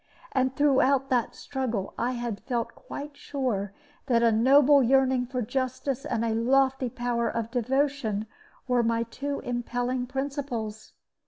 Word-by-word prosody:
And 260 -1 +1
throughout 275 -2 +3
that 245 -3 +1
struggle 240 -8 -3
I 245 +2 -1
had 235 -4 -3
felt 240 -3 -2
quite 290 -11 -8
sure 245 -10 -2 0.4
that 235 -2 +3
a 230 - +5
noble 275 +5 +6
yearning 260 0 +3
for 250 -1 -2
justice 260 +2 -2
and 230 -2 0
a 225 - 0
lofty 260 +2 +2
power 235 -1 -1
of 230 0 -3
devotion 255 -3 0 0.4
were 250 -1 +3
my 230 0 +1
two 280 +5 -4
impelling 245 +1 -2
principles. 260 -5 -4
250 Hz, 140 wpm, -27 LUFS, 230-270 Hz, 0.4 s, noble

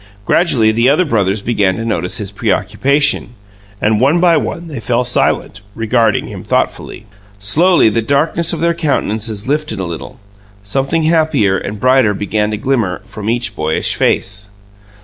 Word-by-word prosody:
Gradually 120 -11 +2
the 115 +3 +2
other 155 +6 +3
brothers 100 - 0
began 100 -5 +1
to 115 - -5
notice 90 -5 -2
his 100 -3 -5
preoccupation, 115 +7 0 0.4
and 105 0 +1
one 140 +8 +3
by 170 -1 +4
one 165 +2 -3
they 150 -6 -7
fell 120 +2 0
silent, 120 -3 0
regarding 115 -1 +1
him - - -8
thoughtfully. 110 - -2 0.3
Slowly 160 - +3
the 110 +1 +1
darkness 150 +7 +1
of 160 - -4
their 170 0 +2
countenances 110 - -1
lifted 150 -6 -2
a 95 - -2
little; 85 +9 -8 0.4
something 135 +9 -1
happier 155 - +2
and 100 +2 -5
brighter 130 -3 +3
began 105 +1 -1
to 105 - -3
glimmer 110 -6 -1
from 105 0 -6
each 120 +1 -1
boyish 80 0 0
face. 100 +1 -1
115 Hz, 155 wpm, -15 LUFS, 105-145 Hz, 0.4 s, by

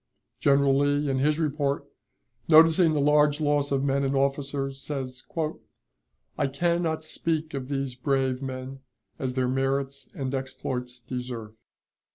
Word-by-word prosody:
General 140 -1 +4
Lee, 145 +1 +2
in 130 - 0
his 150 +2 +2
report, 145 -3 -1 0.6
noticing 160 +1 +7
the 150 - +1
large 150 +1 +4
loss 145 -1 +1
of 135 -1 +1
men 140 0 +1
and 135 0 0
officers, 135 0 -1
says: 130 -3 -5 1.2
"I - - +2
can 170 +5 0
not 160 -2 -1
speak 160 0 -2
of 135 -2 -4
these 135 -2 -2
brave 130 0 0
men 130 0 -6 0.4
as 130 -1 -2
their 130 -1 +1
merits 135 +1 -1
and 135 -1 -3
exploits 130 -2 -4
deserve. 120 -3 -6
140 Hz, 140 wpm, -26 LUFS, 130-145 Hz, 1.2 s, noticing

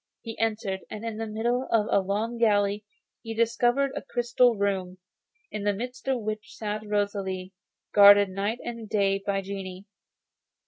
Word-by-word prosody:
He 225 -1 -6
entered, 215 -3 -1
and 215 +2 -7
in 225 -2 -4
the 225 0 -3
middle 235 +4 -1
of 220 -2 +3
a - - +5
long 215 +5 -2
gallery 205 -2 +2 0.4
he 225 0 -6
discovered 240 +4 +2
a - - -3
crystal 240 -1 +2
room, 190 -3 -1 0.5
in 210 - -4
the 205 0 +1
midst 250 +5 -7
of 260 -4 0
which 215 0 -5
sat 210 -1 -3
Rosalie, 200 -3 -2 0.4
guarded 205 -1 +8
night 200 +4 -2
and 230 -3 -6
day 195 -2 +1
by 200 -1 0
genii. 190 -1 -7
210 Hz, 155 wpm, -27 LUFS, 200-230 Hz, 0.5 s, guarded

